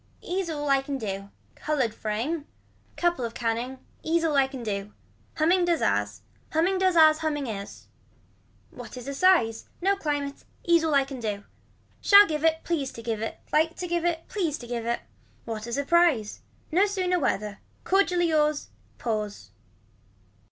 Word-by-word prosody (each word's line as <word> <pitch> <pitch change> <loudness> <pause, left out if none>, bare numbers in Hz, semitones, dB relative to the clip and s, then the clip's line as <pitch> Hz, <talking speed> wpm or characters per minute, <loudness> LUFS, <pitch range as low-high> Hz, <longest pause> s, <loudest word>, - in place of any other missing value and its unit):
Ease 365 -1 -2
all 295 -2 -3
I 275 -1 +4
can 275 0 -4
do. 195 -4 -5 0.2
Colored 265 -7 -1
frame. 240 +10 -3 0.5
Couple 345 -7 +1
of 230 -1 -4
canning. 240 +3 -2 0.2
Ease 330 +1 +1
all 315 -3 +1
I 270 -1 +4
can 265 -3 -8
do. 205 -1 -4 0.4
Humming 345 +3 +3
does 345 -2 +1
as 105 +1 0 0.3
Humming 355 +4 +2
does 370 -2 +2
as 310 -1 +7
humming 295 -3 -1
is. 205 -4 -7 0.9
What - - -10
is 250 +1 -8
a 280 - -3
size. 275 -9 +3
No 390 +3 +2
climate. 290 -6 -3 0.2
Ease 340 -1 +4
all 310 -2 +2
I 275 - +5
can 270 -1 -8
do. 210 -3 -3 0.6
Shall 405 0 +8
give 305 -4 -3
it, 320 0 +2
please 290 -6 -1
to 230 - -9
give 225 -2 -2
it. 225 - -5
Like 320 +2 +3
to 360 - -5
give 345 -1 -1
it, 335 -1 -1
please 340 -8 -1
to 240 - -10
give 235 -1 -3
it. 235 - 0 0.4
What 220 0 -5
a 235 - -5
surprise. 285 -6 +2 0.3
Not 385 +6 +3
sooner 365 -2 0
whether. 210 -7 -1 0.2
Cordially 360 -3 +2
yours. 300 -1 +1 0.3
Pause. 215 -3 -4
290 Hz, 170 wpm, -26 LUFS, 230-340 Hz, 0.9 s, Shall